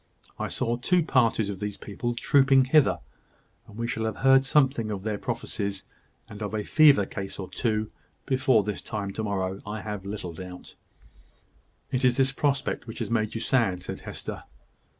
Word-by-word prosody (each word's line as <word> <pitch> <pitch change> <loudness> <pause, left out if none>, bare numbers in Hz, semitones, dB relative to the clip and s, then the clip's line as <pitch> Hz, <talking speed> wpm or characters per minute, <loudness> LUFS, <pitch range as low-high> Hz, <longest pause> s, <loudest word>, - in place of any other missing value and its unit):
I - - -1
saw 120 +1 -1
two 175 +8 +2
parties 115 -7 +2
of 95 - -7
these 105 0 -4
people 120 +4 -4
trooping 135 +1 +4
hither; 150 +2 +4 0.7
and 105 - -13
we 115 - -2
shall 110 -1 -2
have 110 - -2
heard 135 0 +6
something 135 -6 +2
of 100 -3 -4
their 105 -1 -2
prophecies, 100 -1 -3 0.4
and 105 0 -10
of 105 +1 -3
a 105 - -1
fever 145 -6 +5
case 95 0 -6
or 95 - -5
two, 110 0 -1 0.4
before 130 -4 +3
this 105 0 -3
time 100 -3 -4
to 110 - -3
morrow, 95 -2 -2
I 105 +1 -5
have 105 -2 -5
little 100 -3 -5
doubt." 90 +1 -9 1.2
"It 130 +1 0
is 125 0 +4
this 135 0 +3
prospect 135 -2 -1
which 110 - -7
has - - -4
made 110 -2 0
you 115 - -3
sad," 110 -8 +1
said - - -6
Hester. - - -7
110 Hz, 180 wpm, -27 LUFS, 100-130 Hz, 1.2 s, heard